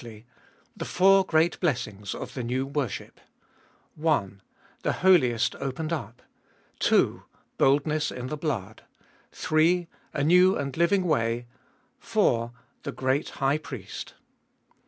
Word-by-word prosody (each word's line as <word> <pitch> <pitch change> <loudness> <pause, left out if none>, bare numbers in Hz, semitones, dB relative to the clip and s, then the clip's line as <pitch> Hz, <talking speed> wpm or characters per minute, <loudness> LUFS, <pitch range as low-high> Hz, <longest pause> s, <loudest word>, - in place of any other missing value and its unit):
The - - -5
four 195 +1 +5
great 165 -1 +2
Blessings 110 - -2
of - - -7
the 130 - -4
new 125 +3 -1
worship: 140 -6 -4 0.7
1. 130 - -1 0.4
The - - 0
Holiest 130 -12 +3
opened 145 +4 -3
up. 120 -7 -6 0.6
2. - - +2 0.4
Boldness 150 +3 +2
in 125 - -6
the 150 - -3
Blood. 120 - -4 0.5
3. 170 +3 +2 0.3
A - - 0
New 180 +4 +5
and 140 -1 -4
Living 170 +3 +3
Way. 120 -7 0 0.5
4. 195 - +1 0.3
The - - -5
Great 130 +3 -1 0.2
High 140 +3 +2
Priest. 120 -10 -8
145 Hz, 115 wpm, -26 LUFS, 120-170 Hz, 0.7 s, four